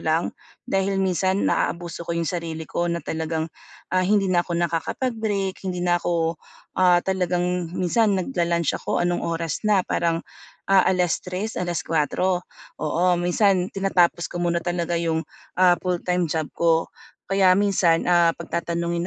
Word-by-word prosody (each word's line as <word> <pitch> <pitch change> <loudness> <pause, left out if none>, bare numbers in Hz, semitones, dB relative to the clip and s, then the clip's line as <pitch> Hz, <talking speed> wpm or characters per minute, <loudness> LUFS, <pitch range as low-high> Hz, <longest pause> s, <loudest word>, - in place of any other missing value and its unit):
lang? 160 +2 0 0.3
Dahil 195 0 0
minsan, 190 +1 +1
naaabuso 170 0 -1
ko 170 - -2
yung 170 - 0
sarili 165 -2 -4
ko 175 0 -1
na 170 0 -2
talagang, 160 0 -2 0.4
ah, 185 - +3
hindi 195 -1 +2
na 175 -1 +4
ako 175 - -4
nakakapag-break, 195 - -1
hindi 180 -1 -2
na 175 0 +3
ako, 165 -2 -1 0.4
ah, 180 -1 +5
talagang 180 -2 -1
minsan 200 +3 +2
nagla-lunch 170 - 0
ako - - -1
anong 175 0 0
oras 165 -1 -2
na, 200 -3 +4
parang, 165 -1 0 0.5
ah, 195 -1 +5
3:00, 180 +2 -1
4:00 175 +2 0 0.4
Oo, 175 +3 +2
minsan 185 +1 +2
tinatapos 180 -3 +2
ko 175 - -5
muna 170 0 +1
talaga 175 -1 -1
yung, 165 -1 -1 0.4
ah, 180 -1 +6
full-time 180 -1 0
job 160 -2 -1
ko. 165 -1 +2 0.4
Kaya 190 -2 +5
minsan, 190 -4 +2
ah, 170 -1 +4
'pag 170 - -10
tatanungin 170 0 -2
175 Hz, 145 wpm, -23 LUFS, 170-185 Hz, 0.5 s, ah